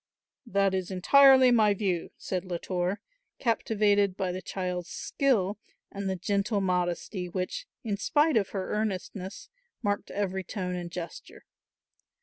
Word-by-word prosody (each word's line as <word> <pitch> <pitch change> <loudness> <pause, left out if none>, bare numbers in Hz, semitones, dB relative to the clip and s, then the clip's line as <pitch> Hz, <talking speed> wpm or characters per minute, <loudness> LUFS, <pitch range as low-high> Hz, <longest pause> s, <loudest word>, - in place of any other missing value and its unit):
"That 195 -2 +2
is 185 -2 -1
entirely 260 +7 +6
my 215 -4 +4
view," 185 -4 -1
said 185 -2 -3
Latour, 180 +1 -2 0.4
captivated 205 -4 +2
by 185 -1 -1
the 185 +1 -5
child's 180 -2 -4
skill 215 -8 0 0.3
and 200 -1 -3
the 190 - 0
gentle 200 +3 0
modesty 180 0 -1
which, 185 - -3 0.2
in 210 -4 -2
spite 300 +7 +2
of 205 -4 +2
her 190 -2 -3
earnestness, 200 -2 -3 0.4
marked 205 -1 -1
every 190 -2 -2
tone 185 -2 -4
and 175 -1 -4
gesture. 170 0 -8
195 Hz, 130 wpm, -28 LUFS, 180-210 Hz, 0.4 s, entirely